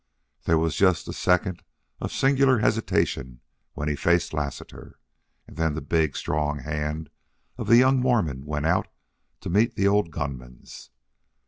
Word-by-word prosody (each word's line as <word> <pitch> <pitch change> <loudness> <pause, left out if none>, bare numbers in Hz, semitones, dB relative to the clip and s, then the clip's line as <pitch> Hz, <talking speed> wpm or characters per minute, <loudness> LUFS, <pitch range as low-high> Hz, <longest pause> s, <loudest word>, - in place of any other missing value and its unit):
There 80 - +3
was 80 0 0
just 95 -4 +2
a - - -5
second 90 0 +1 0.4
of - - -4
singular 135 -1 +3
hesitation 65 - 0 0.3
when 75 - -4
he 75 - 0
faced 85 +3 +1
Lassiter, 75 -3 -6 0.5
and - - -15
then 80 -2 0
the - - -2
big, 80 0 0
strong 75 -1 -1
hand 75 +1 -4 0.4
of - - -6
the 115 - +7
young 130 +1 +5
Mormon 105 - 0
went 75 0 -3
out 90 +4 +1 0.5
to - - -5
meet 105 +5 +2
the 100 - +2
old 100 -3 +2
gunman's. 65 -5 -7
80 Hz, 150 wpm, -25 LUFS, 75-100 Hz, 0.5 s, the